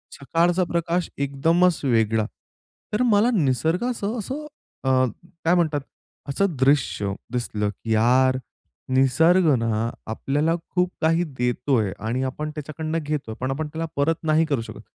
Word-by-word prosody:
सकाळचा 170 +5 +1
प्रकाश 170 +1 0
एकदमच 165 +6 +2
वेगळा. 110 -3 +2 0.7
तर 210 - +1
मला 210 +2 +4
निसर्गाचं 195 - 0
असं 270 +8 -5 0.4
अ, - - +2 0.6
काय 175 +2 +4
म्हणतात? 155 -5 +1 0.5
असं 175 +3 0
दृश्य 130 -7 +2 0.2
दिसलं 105 -4 -1
की 110 +3 -4
यार, 130 +4 +4 0.5
निसर्ग 160 +8 +4
ना 115 0 0 0.2
आपल्याला 145 +8 0
खूप 180 0 +1
काही 165 +2 +3
देतोय 125 -3 +1
आणि 120 +4 -2
आपण 150 +4 -3
त्याच्याकडनं 155 +2 -4
घेतोय. 145 -7 -3
पण 130 +1 -1
आपण 150 +3 -2
त्याला 160 +2 -4
परत 150 +3 +2
नाही 160 +1 +3
करू 140 -7 0
शकत. - - -9
145 Hz, 130 wpm, -23 LUFS, 125-170 Hz, 0.7 s, मला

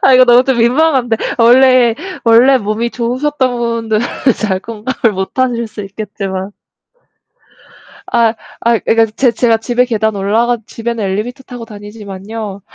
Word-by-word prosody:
아 265 - +5
이거 255 0 +7
너무 245 +1 +6
좀 265 -2 +1
민망한데 250 -1 +2 0.2
원래 245 0 +5 0.3
원래 240 +4 +5
몸이 215 +1 -2
좋으셨던 255 +1 -1
분들은 230 -2 -1 0.4
잘 195 -4 0
공감을 230 +1 -2
못 190 +6 -5
하실 240 -3 0
수 215 -1 -8
있겠지만 195 -1 -6 1.6
아이 235 -2 +2 0.3
아이 235 -1 +1
그러니까 225 0 +3
제 255 -3 +3
제가 230 0 +2
집에 245 +2 0
계단 220 -3 -1
올라가 225 +5 +1
집에는 230 -1 -4
엘리베이터 215 +7 -3
타고 245 -2 -9
다니지만요 205 -1 -8
230 Hz, 320 characters per minute, -14 LUFS, 215-245 Hz, 1.6 s, 이거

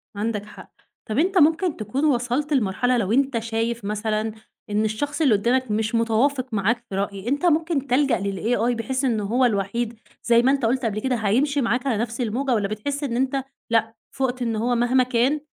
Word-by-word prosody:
عندك 210 0 -2
حق، 210 - -13 0.4
طَب 215 - 0
أنت 370 +4 +2
ممكن 325 +2 +3
تكون 230 +7 -2
وصلت 265 +2 0
لمرحلة 245 +1 +1
لو 205 -3 -1
أنت 265 -1 +2
شايف 225 0 -2
مثلًا، 215 +1 -1 0.4
إن 210 +1 +1
الشخص 290 +9 -2
اللي 275 -7 +4
قدّامك 240 +3 +1
مش 220 +2 0
متوافق 240 +4 +1
معاك 220 +4 0
في 195 - -5
رأي 200 +1 -3
أنت 285 +7 0
ممكن 320 -4 +1
تلجأ 265 -1 +2
للAI 210 +5 0
بحيث 260 +4 -2
إنه 225 -5 0
هو 245 +6 +2
الوحيد، 225 +1 -1 0.2
زي 235 -1 +4
ما 260 +2 +3
أنت 275 -3 0
قُلت 255 +2 0
قبل 215 -1 -1
كده 260 +2 0
هيمشي 255 +7 +1
معاك 245 +3 0
على 230 - +1
نَفْس 230 +2 -3
الموجة 250 +4 -1
والّا 210 -4 +1
بتحس 275 +8 -4
إن 250 -5 -2
أنت، 265 +2 0 0.3
لأ 225 -1 +1 0.2
فُقت 260 -2 -2
إن 230 -2 -1
هو 240 +3 0
مهما 245 +2 +3
كان 255 +4 +1
240 Hz, 195 wpm, -23 LUFS, 220-265 Hz, 0.4 s, اللي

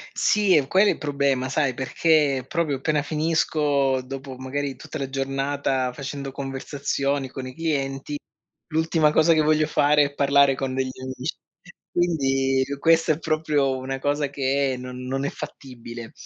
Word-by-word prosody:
Sì, 205 -3 +3
è 145 -4 +3
quello 190 +7 +4
è - - +5
il - - -3
problema. 140 -3 0
Sai, 135 -1 +1
perché 140 +1 +2
proprio 155 -4 0
appena 150 +2 0
finisco, 150 -3 +1
dopo 135 +1 -7
magari 135 +1 -3
tutta 145 - -8
la 135 -3 -4
giornata 135 -1 -1
facendo 140 0 -6
conversazioni 140 0 -2
con 130 0 -7
i 130 - -8
clienti, 145 -3 -2 0.5
l'ultima 160 -1 +2
cosa 160 +2 +5
che 160 - +4
voglio 155 0 +3
fare 150 -1 +4
è 140 0 -5
parlare 140 -1 +4
con 130 -1 -3
degli 130 0 -1
amici. 130 0 -4 0.6
Quindi 135 -6 +1 0.2
questa 165 +1 +4
è 150 - -3
proprio 155 -4 0
una 130 +1 -4
cosa 145 +1 0
che 135 -1 0
non 125 0 -7
non 135 +1 -2
è 140 - -1
fattibile. 120 -5 -9
140 Hz, 155 wpm, -24 LUFS, 135-150 Hz, 0.6 s, è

